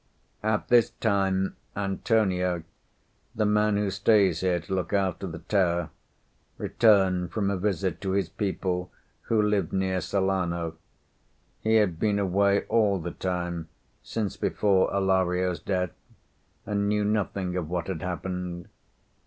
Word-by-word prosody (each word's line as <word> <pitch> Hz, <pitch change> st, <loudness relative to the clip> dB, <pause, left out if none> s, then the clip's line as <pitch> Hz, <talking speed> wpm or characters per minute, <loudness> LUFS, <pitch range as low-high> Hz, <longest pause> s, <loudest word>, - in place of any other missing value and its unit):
At 105 Hz, 0 st, -1 dB
this 120 Hz, -2 st, +5 dB
time, 95 Hz, -3 st, 0 dB, 0.2 s
Antonio, 95 Hz, -3 st, 0 dB, 0.7 s
the 110 Hz, -, +1 dB
man 105 Hz, 0 st, +3 dB
who 100 Hz, -1 st, 0 dB
stays 95 Hz, -3 st, +3 dB
here 90 Hz, -2 st, +1 dB
to 85 Hz, +3 st, -6 dB
look 95 Hz, +1 st, -2 dB
after 95 Hz, -1 st, 0 dB
the 80 Hz, -2 st, -6 dB
tower, 85 Hz, -2 st, 0 dB, 0.7 s
returned 95 Hz, -5 st, +3 dB
from 100 Hz, +1 st, 0 dB
a -, -, 0 dB
visit 95 Hz, -2 st, -1 dB
to 95 Hz, -1 st, -1 dB
his 100 Hz, 0 st, +1 dB
people, 90 Hz, -3 st, -2 dB, 0.4 s
who 115 Hz, -, +3 dB
live 105 Hz, -5 st, +1 dB
near 95 Hz, -1 st, 0 dB
Salerno. 85 Hz, -3 st, -1 dB, 0.8 s
He 110 Hz, 0 st, +2 dB
had 100 Hz, -7 st, +2 dB
been 105 Hz, -2 st, +2 dB
away 100 Hz, +1 st, +2 dB
all 105 Hz, -4 st, +2 dB
the 85 Hz, 0 st, -5 dB
time 85 Hz, -3 st, -3 dB, 0.3 s
since 105 Hz, -4 st, -3 dB
before 100 Hz, -3 st, +2 dB
Alario's 95 Hz, -2 st, +1 dB
death 90 Hz, 0 st, -1 dB, 0.7 s
and 100 Hz, 0 st, 0 dB
knew 105 Hz, 0 st, +1 dB
nothing 100 Hz, -3 st, -1 dB
of 85 Hz, -4 st, -3 dB
what 90 Hz, -1 st, -2 dB
had 90 Hz, -5 st, -4 dB
happened. 90 Hz, -1 st, -4 dB
95 Hz, 135 wpm, -27 LUFS, 90-100 Hz, 0.8 s, this